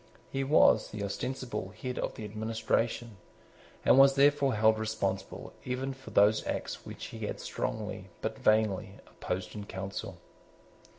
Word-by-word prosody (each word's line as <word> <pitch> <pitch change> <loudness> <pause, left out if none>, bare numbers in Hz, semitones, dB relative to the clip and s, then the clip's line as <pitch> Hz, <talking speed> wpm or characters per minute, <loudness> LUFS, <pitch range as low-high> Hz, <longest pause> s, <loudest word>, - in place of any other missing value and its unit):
He 135 0 -1
was 140 +3 +5
the 105 -1 -5
ostensible 105 -1 -4
head 125 -1 -4
of - - -2
the 110 - -6
administration, 110 +1 -1 0.7
and 135 - +7
was 135 0 +7
therefore 140 -2 +4
held 110 +1 +4
responsible 100 -3 -3
even 130 +2 -2
for 135 0 -12
those 105 +1 +4
acts - - -4
which - - -7
he - - -4
had - - -5
strongly, 105 -3 -4
but 110 0 -4
vainly, 110 -3 +2
opposed 90 0 -5
in 105 -1 -7
Council. 95 +1 -5
110 Hz, 140 wpm, -30 LUFS, 100-130 Hz, 0.7 s, and